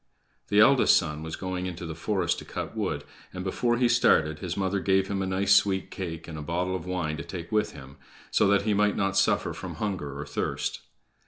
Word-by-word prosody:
The 105 - +3
eldest 135 +4 +6
son 75 -3 -2
was 80 0 -5
going 95 -1 -3
into 90 -1 -6
the 80 - -5
forest 90 +1 -1
to - - -9
cut - - -5
wood, - - -2 0.3
and, 90 0 -5
before 120 +5 0
he 125 0 +3
started, 80 -10 +3
his 85 +1 -4
mother 95 0 0
gave 95 0 +2
him 100 -1 -1
a 95 - -1
nice 95 +1 +2
sweet 95 -2 +2
cake 80 -4 -6
and 80 -2 -7
a - - -5
bottle 90 +4 -1
of 90 -1 -6
wine 85 -4 -2
to 85 - -5
take 85 -1 -7
with 105 -1 +1
him, 65 -2 -12 0.3
so 105 - +4
that 100 0 +3
he 105 0 +1
might 105 0 +2
not 95 -1 0
suffer 100 - +2
from - - -7
hunger 80 -10 -4
or 70 - -4
thirst. - - -3
95 Hz, 225 wpm, -27 LUFS, 80-100 Hz, 0.3 s, eldest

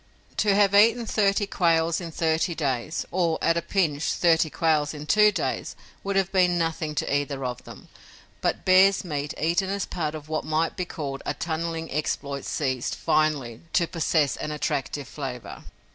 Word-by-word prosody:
To 205 -2 +3
have 200 -1 +4
eaten 230 +3 +5
thirty 205 -1 +2
quails 170 -3 +1
in 170 - -5
thirty 160 +1 0
days 140 0 -2
or, 170 -3 +1
at 165 - +2
a 170 - 0
pinch, 160 -7 0
thirty 165 -2 +3
quails 155 -2 +1
in 150 0 -7
two 210 +5 +5
days 200 - -3 0.3
would 200 0 -2
have 195 -1 +1
been 180 -2 +3
nothing 160 -2 -2
to 140 - 0
either 140 -2 -2
of 125 -1 -5
them, - - -12 0.5
but - - -1
bear's 190 +1 +5
meat 145 -3 -3
eaten 170 +4 +1
as 200 0 -1
part 155 -3 -3
of 150 -1 -9
what 155 0 -2
might 155 +1 0
be 180 - -3
called 140 -5 -5
a - - -3
tunneling 165 0 -3
exploit 140 -1 -3
ceased, 130 -4 -2
finally, 140 -7 0
to 170 - +3
possess 160 -3 0
an - - -4
attractive 145 -2 -3
flavor. 130 -5 -7
160 Hz, 175 wpm, -25 LUFS, 150-180 Hz, 0.5 s, eaten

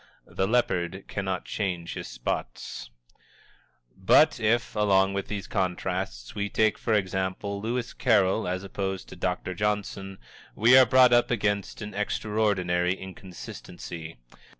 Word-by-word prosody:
The 95 - -1
leopard 95 -5 0
cannot 95 -2 -3
change 90 -5 -3
his - - -6
spots. - - -5 1.1
But 145 +10 +4
if, 115 +2 +1
along 100 -2 +3
with 100 0 -3
these 100 -2 -4
contrasts, 75 -9 -2
we 105 0 -2
take, 110 +1 +2
for 115 - +1
example, 95 +1 -2
Lewis 120 +2 -2
Carroll 95 +2 +2
as 90 +1 -2
opposed 95 -1 -4
to - - -9
Dr. 90 +1 -2
Johnson, 95 -1 -2 0.4
we 115 +4 +6
are 130 -1 +8
brought 130 0 +6
up 120 0 +4
against 105 -2 -1
an 105 - -7
extraordinary 100 -4 0
inconsistency. 85 -4 -9
100 Hz, 125 wpm, -27 LUFS, 95-105 Hz, 1.1 s, are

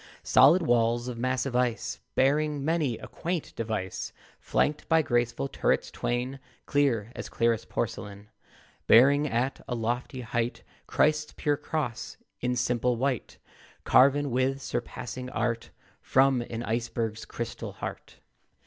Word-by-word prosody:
Solid 165 +7 +6
walls 120 -3 +2
of 120 -2 -5
massive 130 +1 -1
ice, 125 -2 0 0.2
Bearing 145 +1 +2
many 155 -7 +1
a - - -9
quaint 175 -2 -4
device, 110 -5 -3 0.3
Flanked 150 0 0
by 160 -1 +4
graceful 120 - 0
turrets - - 0
twain, 125 +3 -2 0.3
Clear 120 -7 +1
as - - -6
clearest 115 -1 0
porcelain, 105 -2 -4 0.6
Bearing 140 +6 +6
at 130 +1 -1
a 125 - -2
lofty 120 +3 -2
height 120 0 -2 0.2
Christ's 150 0 +2
pure 145 -1 +1
cross 145 -5 -4 0.2
in 125 0 0
simple 125 0 +1
white, 130 0 -2 0.5
Carven 140 +1 +4
with 130 +2 +1
surpassing 125 0 -5
art 115 -2 -2 0.3
From 135 -1 +3
an 115 0 -4
iceberg's 115 -1 -2
crystal 115 0 -6
heart. - - -7
125 Hz, 125 wpm, -28 LUFS, 115-140 Hz, 0.6 s, Solid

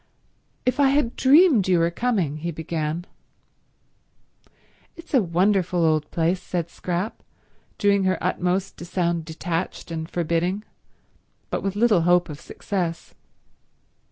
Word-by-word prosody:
"If 255 +3 0
I 280 -1 +5
had 275 -4 +1
dreamed 275 - +5
you 180 -1 +4
were 170 0 +2
coming—" 185 - -1
he 170 +3 -4
began. 160 +1 -3 1.9
"It's 335 -1 -14
a 260 - +5
wonderful 180 -1 +1
old 155 -2 +1
place," 170 +2 0
said 170 -2 -3
Scrap, 180 +4 -3 0.6
doing 200 -1 +2
her 185 0 +2
utmost 180 +2 -1
to 170 - -8
sound 170 -2 -1
detached 165 +2 -4
and 160 0 -4
forbidding, 175 +4 -1 0.9
but - - -1
with 195 0 -2
little 210 -4 +4
hope 175 +1 +3
of 150 0 -8
success. 175 -5 -4
180 Hz, 130 wpm, -24 LUFS, 165-200 Hz, 1.9 s, I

